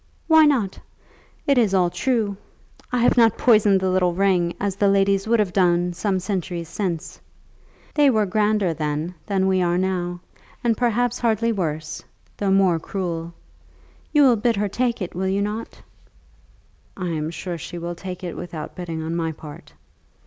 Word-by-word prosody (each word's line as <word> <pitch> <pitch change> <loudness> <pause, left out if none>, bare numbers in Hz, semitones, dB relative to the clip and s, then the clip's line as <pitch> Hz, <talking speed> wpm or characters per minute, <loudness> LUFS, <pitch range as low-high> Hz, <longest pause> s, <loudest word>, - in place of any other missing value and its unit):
"Why 320 -1 +6
not? 230 -10 0 0.7
It 280 -3 +3
is 205 -5 +2
all 180 -2 +3
true. 225 -5 0 0.6
I 250 - 0
have 245 - +3
not 225 -3 +5
poisoned 210 -5 +4
the 190 0 0
little 180 -2 +2
ring, 180 -3 +2
as 200 -1 -1
the 200 0 +2
ladies 195 0 +2
would 235 +1 +3
have 205 -5 0
done 175 -1 +2
some 190 +1 -1
centuries 180 -3 -3
since. 175 -6 -4 0.7
They 295 -2 +5
were 215 -4 +2
grander 210 -2 +1
then 155 +2 -3
than 195 -2 +1
we 190 -1 +2
are 175 0 +1
now, 180 -1 -2 0.4
and 235 -2 +2
perhaps 245 +1 0
hardly 230 0 +1
worse, 155 -6 -3 0.4
though 200 - -1
more 190 -3 +3
cruel. 170 -2 -4 0.8
You 295 -1 +5
will 250 -4 +5
bid 230 +2 +1
her 205 +1 0
take 235 0 -1
it, 180 - -6
will 190 +2 -2
you 195 +1 +1
not?" 210 +2 -5 1.2
"I 180 -2 -3
am 155 -1 -2
sure 170 0 -5
she 175 - -7
will 170 0 -4
take 180 +1 -8
it 175 - -5
without 165 -3 -7
bidding 165 -3 -5
on 165 +1 -3
my 165 -1 -1
part." 150 -1 -11
190 Hz, 170 wpm, -22 LUFS, 175-215 Hz, 1.2 s, Why